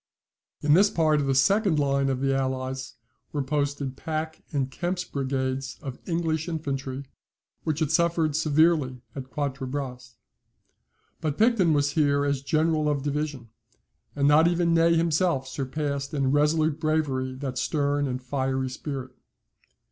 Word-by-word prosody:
In 150 0 +4
this 200 +5 +6
part 155 -4 +2
of 140 - -1
the 135 - +2
second 195 +4 +3
line 140 -1 +2
of 130 -1 -1
the 135 0 +2
Allies 130 0 -3 0.4
were 145 -2 -1
posted 140 -1 -2
Pack 160 +2 -4
and 135 -3 -1
Kempt's 180 +4 -2
brigades 130 -2 -2
of 135 -3 -7
English 165 -1 -1
infantry, 140 -4 -4 0.6
which 155 -1 -1
had 155 -2 +1
suffered 165 -2 +2
severely 155 -4 +2
at 130 -2 -7
Quatre 135 -2 -3
Bras. 125 -3 -5 1.0
But 150 -2 -2
Picton 215 -8 +4
was 145 -1 +2
here 145 -2 +2
as 140 -2 0
general 155 +1 +1
of 140 -2 -1
division, 145 -4 -3 0.7
and 140 -1 +2
not 155 +3 +6
even 170 -1 +2
Ney 165 0 +4
himself 165 -4 +1
surpassed 140 +1 -3
in 135 -2 +1
resolute 150 +1 +2
bravery 145 -5 0
that 130 -1 -4
stern 145 0 0
and 130 0 -4
fiery 130 0 -1
spirit. 130 -2 -6
145 Hz, 145 wpm, -26 LUFS, 135-160 Hz, 1.0 s, this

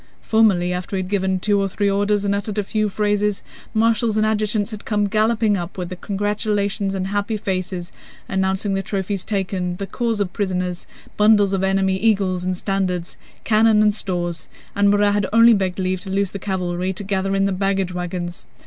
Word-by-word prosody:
Formerly, 195 -6 +3
after 180 +2 -4
he 190 - -1
had 185 - -9
given 190 -2 +1
two 205 +1 +2
or 195 - +1
three 205 +2 -1
orders 205 +1 +1
and 200 - +1
uttered 205 +1 -3
a 210 - +1
few 215 +1 -1
phrases, 210 0 0 0.3
marshals 225 0 +2
and 215 - +3
adjutants 215 0 0
had 215 -1 -7
come 205 -1 0
galloping 215 +1 +2
up 175 0 -5
with 180 -1 -4
congratulations 205 -1 -1
and 185 -1 -2
happy 205 +2 -1
faces, 185 -3 -3 0.4
announcing 190 +1 0
the 195 - 0
trophies 195 0 -3
taken, 190 -3 -2
the 195 - -4
corps 230 +2 -2
of 195 -3 -1
prisoners, 180 -3 -2 0.3
bundles 210 -2 +4
of 190 -1 0
enemy 190 0 +2
eagles 195 -4 +1
and 185 0 -1
standards, 185 -3 -2 0.3
cannon 220 -1 +4
and 210 -1 +4
stores, 175 -5 -3 0.3
and 200 0 +4
Murat 205 0 +3
had 205 -1 +1
only 230 +1 +7
begged 190 -3 0
leave 185 -1 -1
to 195 - -8
loose 195 0 0
the 200 - -6
cavalry 185 -1 -2
to 195 - -7
gather 195 0 -1
in 195 0 +2
the 195 - +1
baggage 195 -1 0
wagons. 175 -1 -4
195 Hz, 190 wpm, -21 LUFS, 185-210 Hz, 0.4 s, only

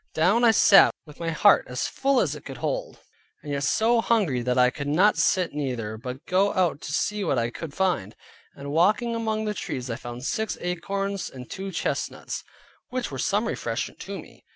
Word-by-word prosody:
Down 185 +9 +3
I 235 - +7
sat, 200 -2 +6
with 150 -2 -14
my 165 -1 -2
heart 200 +5 +5
as 125 0 -2
full 275 -1 +1
as - - 0
it - - -9
could - - -8
hold, - - -3 0.5
and 145 - -6
yet 140 -1 -1
so 230 +8 +3
hungry 190 - +1
that 125 +1 0
I 125 0 +5
could 140 +1 -5
not 185 +9 +4
sit 165 +1 +1
neither; 125 -7 -3
but 125 +4 -7
going 195 +2 +2
out 175 -5 +1
to - - -6
see 210 0 -1
what 150 -7 0
I 120 0 0
could 160 +3 -7
find, 175 - 0 0.4
and 140 0 -7
walking 210 +9 +2
among 220 -1 -1
the 210 - -1
trees, 130 - -4
I - - -2
found 120 +2 -8
six 220 +6 -2
acorns, 195 +3 -3
and 125 -2 -10
two 195 0 -6
chestnuts, - - -3 0.5
which 255 -7 -3
were 135 - -5
some 205 - +1
refreshment - - -3
to - - -6
me. - - -15
180 Hz, 200 wpm, -25 LUFS, 135-210 Hz, 0.5 s, I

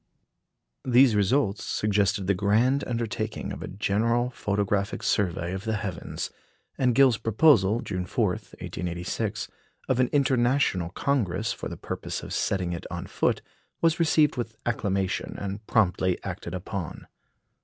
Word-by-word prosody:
These 125 -1 +5
results 105 0 +2
suggested 100 -1 +1
the 100 - +3
grand 110 +8 +2
undertaking 115 -2 -3
of - - -7
a - - -5
general 115 +5 0
photographic 100 -3 -1
survey 90 -3 0
of 95 +1 -4
the 110 -1 -1
heavens, 100 -4 -4 0.4
and 125 -3 +2
Gill's 130 -6 +5
proposal, 115 -3 +4
June 90 -1 -4
4, - - +1
1886, 90 +5 -4 0.4
of 130 -1 +1
an 125 - +4
International 130 - +2
Congress 115 -2 0
for - - -6
the - - -7
purpose - - -5
of - - -6
setting 90 -3 0
it 85 - -6
on - - -5
foot - - 0 0.4
was 165 +1 +2
received 155 -4 +3
with 115 -2 -3
acclamation, 100 -5 -1
and 100 +2 -5
promptly 95 -4 +2
acted 85 - -5
upon. 95 -2 -5
105 Hz, 135 wpm, -27 LUFS, 95-120 Hz, 0.4 s, These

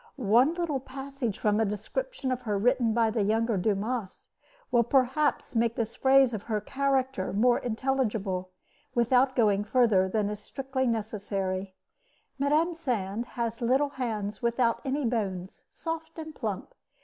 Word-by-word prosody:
One 250 +5 +3
little 335 -6 -1
passage 270 -3 -5
from 210 0 +1
a - - +4
description 260 - -3
of 255 0 -2
her 210 -4 -1
written 240 +2 +2
by 225 0 +2
the 220 -1 0
younger 220 +2 +1
Dumas 205 +2 -2 0.4
will 240 - +5
perhaps 265 +4 +1
make 230 0 +2
this 225 -1 -2
phase 265 -2 +5
of 215 - -3
her 215 0 -2
character 265 -1 -1
more 240 +5 +3
intelligible, 220 -7 -1 0.5
without 250 +2 +3
going 205 -4 +3
further 210 -5 +3
than 210 +1 0
is 210 - -5
strictly 260 +3 -3
necessary: 195 -4 -2 0.6
Mme. 305 +5 +2
Sand 235 - -2
has 230 0 -2
little 265 +5 +2
hands 215 -6 -4
without 235 0 +1
any 275 0 -1
bones, 195 -6 -2
soft 325 0 -6
and 315 -1 -7
plump. 220 - -4
235 Hz, 145 wpm, -28 LUFS, 210-265 Hz, 0.6 s, will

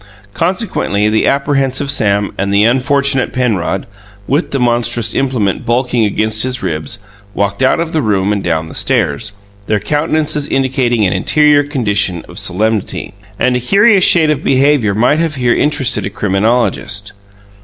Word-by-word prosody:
Consequently, 170 - -1
the 110 +1 +1
apprehensive 140 -1 0
Sam 100 -6 +1
and 100 +1 -2
the 100 +1 +3
unfortunate 135 +2 +1
Penrod 105 -6 -1 0.4
(with 145 +6 0
the 135 - -2
monstrous 120 -2 0
implement 125 -8 -1
bulking 120 -1 0
against 110 +1 0
his 130 -1 -2
ribs) 80 -5 -3 0.4
walked 100 +3 -2
out 130 +5 +2
of 165 -1 -2
the 160 - 0
room 105 -3 0
and 100 - -3
down 80 0 -1
the 80 - -10
stairs, 105 +9 -1 0.4
their 105 - +1
countenances 150 +2 -1
indicating 130 -5 0
an 90 - +1
interior 150 +9 +3
condition 105 - -1
of - - -7
solemnity. 105 +1 -1 0.2
And 125 0 +1
a - - +1
curious 200 - +3
shade 160 -4 +4
of 150 - -2
behaviour 135 -6 +2
might 125 +8 +2
have 165 -2 -1
here 125 -2 +1
interested 135 -7 0
a - - -4
criminologist. 105 0 -1
120 Hz, 155 wpm, -14 LUFS, 105-140 Hz, 0.4 s, shade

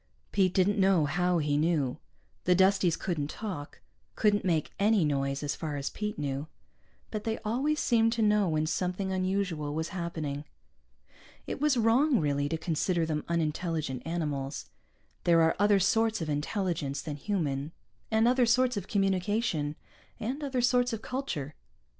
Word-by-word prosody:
Pete 190 -2 +3
didn't 200 +2 +3
know 190 -5 +4
how 180 +3 +1
he 145 -2 +1
knew. 155 -4 +1 0.5
The 180 - +4
Dusties 190 -2 +3
couldn't 155 -6 -2
talk, 180 -10 -6 0.3
couldn't 205 -1 +2
make 165 -5 0
any 205 -3 +4
noise, 140 -1 -1
as 145 - -1
far 155 -3 -4
as 140 -1 -3
Pete 210 0 -4
knew. 140 0 -3 0.6
But 215 -1 -3
they 225 -1 -1
always 275 +8 0
seemed 230 -2 +3
to 230 -2 0
know 210 -3 +3
when 155 -1 +1
something 180 +4 -1
unusual 185 -6 -1
was 160 +1 -2
happening. 160 -5 -4 1.0
It - - -5
was 295 -3 +3
wrong, 240 +4 +4
really, 145 -1 0
to 160 - -1
consider 165 +1 0
them 155 -2 -2
unintelligent 160 -4 -1
animals. 150 -4 -3 0.5
There 165 -1 +5
are 160 - +3
other 205 -1 +4
sorts 225 +4 +2
of 160 -3 -3
intelligence 150 -2 -2
than 150 -2 -5
human, 150 -6 -2 0.4
and 220 +1 +3
other 250 -1 +4
sorts 250 0 +3
of 200 -1 -4
communication, 195 -5 0 0.4
and 265 +7 -3
other 265 -3 -1
sorts 245 0 +2
of 220 - -5
culture. 180 - -4
180 Hz, 155 wpm, -29 LUFS, 150-215 Hz, 1.0 s, There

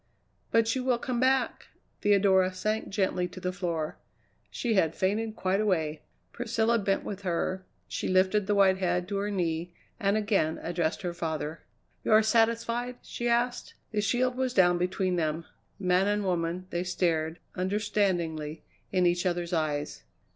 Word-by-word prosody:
"But 230 +1 +3
you 260 - -1
will 250 -2 +2
come 245 0 -2
back 260 0 +1
" - - -43
Theodora 195 -2 +4
sank 215 +3 -1
gently 190 -3 0
to 185 - -10
the 180 0 -2
floor. 170 -5 -3 0.5
She 235 -2 -1
had 165 -6 +2
fainted 215 +3 0
quite 190 +2 0
away! 160 -7 0 0.3
Priscilla 230 -1 +1
bent 195 -1 0
with 200 -1 -5
her, 185 +1 -1 0.2
she - - -3
lifted 190 +2 +3
the 205 - +2
white 190 -1 +4
head 180 -1 0
to 200 - -1
her 200 +1 -1
knee, 175 -3 -2 0.2
and 200 -1 +2
again 205 -7 +1
addressed 170 0 -1
her 175 -1 -2
father. 160 -1 -3 0.4
"You - - +2
are 215 0 +7
satisfied?" 230 +2 +1
she 240 0 -3
asked. 240 +1 0 0.2
The 210 -2 0
shield 250 +4 +1
was 255 -1 -1
down 175 -2 +5
between 185 0 0
them. 160 0 -1 0.3
Man 185 0 +2
and 205 0 +1
woman, 175 -1 -1
they 175 +1 -1
stared, 165 -3 0 0.2
understandingly, 180 -6 -1 0.3
in 185 -2 +2
each 175 +1 +2
other's 175 -1 -2
eyes. 150 -3 -1
190 Hz, 160 wpm, -28 LUFS, 175-215 Hz, 0.5 s, are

